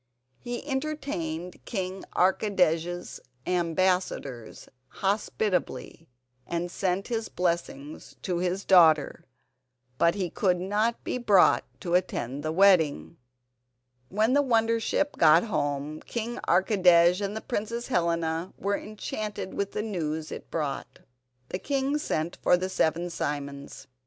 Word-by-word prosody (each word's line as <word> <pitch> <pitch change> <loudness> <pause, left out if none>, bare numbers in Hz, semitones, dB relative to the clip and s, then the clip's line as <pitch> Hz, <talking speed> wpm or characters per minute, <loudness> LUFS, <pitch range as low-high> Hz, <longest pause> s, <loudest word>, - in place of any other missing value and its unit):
He 240 +3 -6
entertained 265 - -4
King 190 -3 -4
Archidej's 180 -3 +1 0.3
ambassadors 175 - -1 0.2
hospitably, 195 -4 -2 0.4
and 170 +1 -3
sent 190 +3 -1
his 225 -2 -2
blessing 170 -5 -2 0.2
to 180 -2 -1
his 180 +2 -1
daughter, 160 -5 +5 0.7
but 170 +2 +4
he 185 -4 -2
could 180 -3 +1
not 210 +5 0
be 250 - -2
brought 205 -6 +4 0.2
to 175 - -3
attend 145 -7 0
the 155 +1 -2
wedding. 160 - +3 0.9
When 215 +5 +2
the 285 - +5
wonder 230 -3 +2
ship 290 +6 -1
got 160 +1 +6
home 150 -6 -2
King 235 +1 -4
Archidej 180 -1 +4
and 205 +2 -4
Princess 230 +4 -3
Helena 170 -3 -1
were 200 +1 0
enchanted 210 -2 -5
with 200 0 -3
the 210 - -2
news 160 -7 -3
it - - -8
brought. 145 -4 -4 0.5
The 185 - -3
king 275 +5 0
sent 160 - -2
for 180 - +4
the 185 +1 -3
seven 170 -1 0
Simons. 140 -3 -5
180 Hz, 120 wpm, -27 LUFS, 165-210 Hz, 0.9 s, got